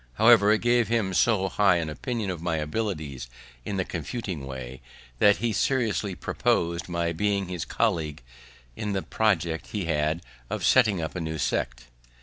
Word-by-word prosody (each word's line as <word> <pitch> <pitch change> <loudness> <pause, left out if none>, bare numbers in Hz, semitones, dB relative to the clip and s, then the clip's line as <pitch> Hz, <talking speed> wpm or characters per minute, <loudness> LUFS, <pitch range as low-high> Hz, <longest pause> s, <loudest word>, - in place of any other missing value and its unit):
However, 110 - +6
it 110 - +3
gave 120 -1 +3
him 110 -4 0
so 100 -1 +3
high 95 -1 +3
an 85 -2 -1
opinion 105 - -3
of 85 -3 -6
my 85 -2 -1
abilities 75 - -3 0.4
in 100 - -3
the 95 - 0
confuting 85 - -5
way, 65 -1 -7 0.4
that 105 0 +5
he 120 -2 -1
seriously 110 -5 0
proposed 85 0 -1
my 85 -1 -1
being 100 +2 0
his 90 -2 -4
colleague 80 - -1 0.5
in 105 -2 -3
a 95 - -1
project 85 -7 0
he 100 -4 -3
had 80 +1 0 0.3
of - - -2
setting 105 -9 +4
up 80 - -4
a 90 - -3
new 80 0 -3
sect. 65 -3 -2
90 Hz, 165 wpm, -26 LUFS, 80-105 Hz, 0.5 s, However